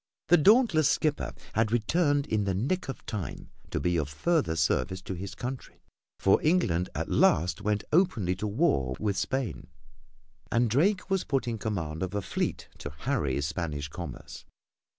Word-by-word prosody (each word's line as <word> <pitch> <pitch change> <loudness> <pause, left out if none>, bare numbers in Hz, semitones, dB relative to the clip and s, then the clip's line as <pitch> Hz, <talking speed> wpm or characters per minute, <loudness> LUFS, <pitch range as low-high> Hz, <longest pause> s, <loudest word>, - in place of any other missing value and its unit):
The 175 - +7
dauntless 175 - +5
skipper 150 +1 0 0.2
had 110 -1 +1
returned 145 +5 +2
in 110 -7 0
the 95 -2 0
nick 135 - -1
of 135 - -6
time 100 - -5 0.2
to - - -2
be 90 +4 +1
of 75 -3 -1
further 140 - +1
service 95 +3 +1
to 95 - -5
his 95 +2 -6
country, 125 +1 -7 0.3
for 95 - +3
England 95 - +2
at - - -2
last 90 +6 +3
went 105 0 0
openly 135 - +2
to 105 - -2
war 100 - +1
with 105 -2 0
Spain, 110 +1 -2 0.8
and 120 -1 +2
Drake 185 - +2
was 195 -1 +2
put 135 -2 -1
in 115 -2 -2
command 80 -8 -3
of 95 +1 -3
a 100 - 0
fleet - - -2
to - - -5
harry 105 - 0
Spanish 75 -1 -3
commerce. 75 -4 -8
105 Hz, 165 wpm, -28 LUFS, 90-145 Hz, 0.8 s, The